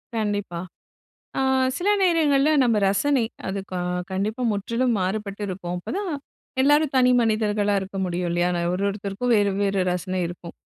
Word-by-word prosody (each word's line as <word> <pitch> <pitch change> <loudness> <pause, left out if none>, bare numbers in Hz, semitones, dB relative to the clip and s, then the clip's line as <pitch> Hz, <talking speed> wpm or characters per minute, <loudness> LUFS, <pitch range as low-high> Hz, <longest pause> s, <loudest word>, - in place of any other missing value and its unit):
கண்டிப்பா. 205 -5 -2 0.8
ஆ, - - +2 0.4
சில 375 +3 0
நேரங்கள்ல 310 -6 +3
நம்ம 230 -3 +3
ரசனை 255 +6 +2 0.2
அது 195 +1 -2
க - - -4 0.4
கண்டிப்பா 210 +6 -2
முற்றிலும் 230 +5 0
மாறுபட்டு 200 +2 -3
இருக்கும். 180 -2 -4
அப்பதான் 370 - -4 0.5
எல்லாரும் 290 +1 +3
தனி 250 -1 +5
மனிதர்களா 215 -2 +1
இருக்க 195 +1 -7
முடியும் 180 0 -2
இல்லயா! 175 +1 +1
நா 175 - 0
ஒரு 185 +2 -1
ஒருத்தருக்கும் 200 +4 -3
வேறு, 205 -1 +3
வேறு 200 -1 +1
ரசனை 185 +1 -2
இருக்கும். 175 0 -9
205 Hz, 145 wpm, -24 LUFS, 190-250 Hz, 0.8 s, தனி